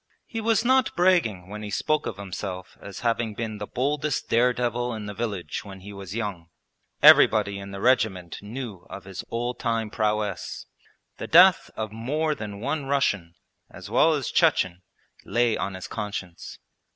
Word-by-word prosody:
He 225 -2 -5
was 225 0 +2
not 260 -1 +3
bragging 170 - +2
when 105 +2 -7
he 105 - -6
spoke 155 +8 0
of 100 - -5
himself 95 -1 -6
as 100 -2 -9
having 115 -2 0
been 110 -2 -4
the 105 - -5
boldest 145 +2 -1
dare 120 +2 +4
devil 120 0 -1
in 110 -1 -6
the 105 - -5
village 100 -7 -4
when 95 -2 -10
he 100 +2 -9
was 100 0 -8
young. 100 -7 -4 0.5
Everybody 100 -2 +7
in 100 0 -8
the 100 0 -7
regiment 100 -8 +1
knew 105 -3 -7
of - - -8
his 95 -1 -7
old 120 +1 -3
time 115 -3 -1
prowess. 105 -3 -2 0.5
The - - -6
death 180 +2 +6
of 110 -1 -4
more 150 +8 -1
than 105 -6 -7
one 140 +5 -2
Russian, 105 -12 0 0.3
as - - -11
well 160 - +5
as 140 -5 -3
Chechen, 90 -1 +2 0.4
lay 120 -1 +1
on 100 -1 -3
his 95 - -7
conscience. 95 -4 -6
110 Hz, 170 wpm, -25 LUFS, 100-125 Hz, 0.5 s, Everybody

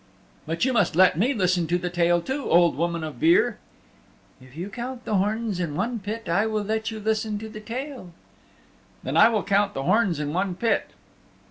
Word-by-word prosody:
"But 165 +7 0
you 260 - +1
must 205 -9 +2
let 185 -1 +5
me 220 - +2
listen 185 -7 +1
to 175 +2 +1
the 180 0 -4
tale 175 -1 +2
too, 265 +1 -3
Old 170 -3 +4
Woman 170 +2 -2
of 155 - -7
Beare." 350 +7 +3 0.8
"If 130 +3 -16
you 180 +4 -5
count 250 +3 -6
the 210 - +1
horns 210 0 -1
in 165 -5 -3
one 230 +6 -2
pit 215 +3 -6
I 200 +6 +1
will 215 -1 -1
let 220 +2 -2
you 220 -1 -6
listen 215 0 -1
to 220 +1 -7
the 215 0 -9
tale." 250 -2 -6 0.9
"Then - - -3
I - - +7
will 220 -3 0
count 200 0 +1
the 135 - -3
horns 195 -2 +2
in 150 0 -3
one 185 0 -1
pit." 230 +5 0
205 Hz, 205 wpm, -24 LUFS, 175-225 Hz, 0.9 s, I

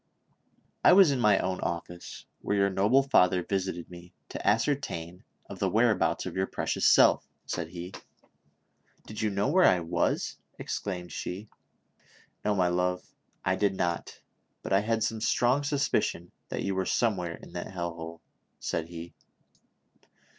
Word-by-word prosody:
" - - -41 0.3
I - - +8
was 190 -5 +7
in 135 - 0
my 105 -4 +5
own 95 0 -1
office, 85 +1 -5 0.2
where 100 - 0
yovu* 100 - -3
noble 110 +9 +4
father 90 -9 +3
visited 95 -2 -2
me, 85 0 -12
to - - -6
ascertain 105 - 0 0.2
of - - -9
the - - +1
whereabouts - - +2
of - - -5
your 95 0 0
precious - - 0
self," - - +5 0.2
said 85 -2 -3
he. 90 +2 -8 1.1
"Did 110 - -7
you 110 - +1
know 100 0 0
where 185 0 +4
I 90 - +4
was?" 80 - -1 0.2
exclaimed 90 -3 -4
she. 100 +4 -5 0.9
"No, 105 -1 +1
my 90 -2 +2
love, 90 +1 0 0.4
I 95 - +2
did 100 -1 +1
not; 85 -2 -2 0.4
but - - -2
I 95 - +6
had 110 +1 0
some 110 -1 -2
strong 125 +5 +2
sus 145 -1 0
picion 85 +1 -1 0.2
that - - -3
you 100 - -1
were 95 -1 -1
somewhere 90 -8 0
in - - -14
that - - -5
hell 85 -2 -4
hole," 85 0 -8 0.4
said 80 -1 -2
he. 85 0 -9
95 Hz, 160 wpm, -28 LUFS, 85-105 Hz, 1.1 s, I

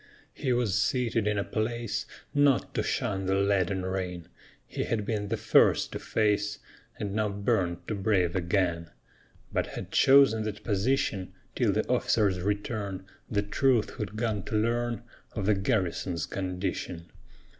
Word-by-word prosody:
He 135 -3 -2
was 110 -5 +2
seated 115 -2 +1
in 105 0 +1
a 100 - +1
place, 115 +1 -2 0.3
Not 145 -2 +3
to - - 0
shun 95 -7 -1
the 95 - +2
leaden 95 -1 +1
rain 90 -2 -4 0.4
He - - -3
had 105 -3 -1
been 105 -2 -2
the - - -1
first - - +4
to - - -4
face, 105 -1 0 0.4
And 100 -2 -3
now 110 0 +1
burned 95 -3 -1
to - - -2
brave 95 -4 +1
again, 85 -2 0 0.6
But - - 0
had - - -7
chosen 135 -5 +6
that 105 -1 -5
position 105 -2 0 0.2
Till - - +2
the - - 0
officer's 100 -5 +2
return 100 -1 -2 0.2
The 105 -2 +1
truth 120 +2 +2
who'd 105 -4 -5
gone 110 -2 -1
to - - -3
learn 120 +2 0 0.3
Of 100 -4 -3
the 105 - +4
garrison's 95 -3 -1
condition. 90 -2 -4
105 Hz, 150 wpm, -28 LUFS, 95-115 Hz, 0.6 s, chosen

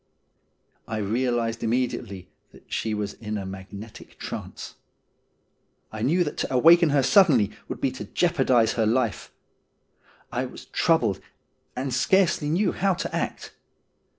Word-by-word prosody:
I 110 - -3
realised 115 +2 -1
immediately 115 -5 -2 0.3
that - - -17
she 110 -1 -1
was 105 -1 -3
in 105 -1 -5
a 100 - -5
magnetic 100 +3 -10
trance. - - -7 1.2
I 110 - -6
knew 165 +10 +2
that 150 - -5
to - - -2
awaken 165 +6 +6
her 140 -2 +3
suddenly 135 - +5 0.2
would - - -6
be 135 - 0
to 130 - -7
jeopardise 135 -10 +2
her 115 -3 +1
life. 115 -2 0 1.0
I - - -2
was - - -12
troubled, - - +1 0.5
and 130 0 -3
scarcely 170 +2 +2
knew 180 +7 +2
how 195 0 +1
to 185 - -4
act. - - -4
125 Hz, 135 wpm, -25 LUFS, 110-150 Hz, 1.2 s, awaken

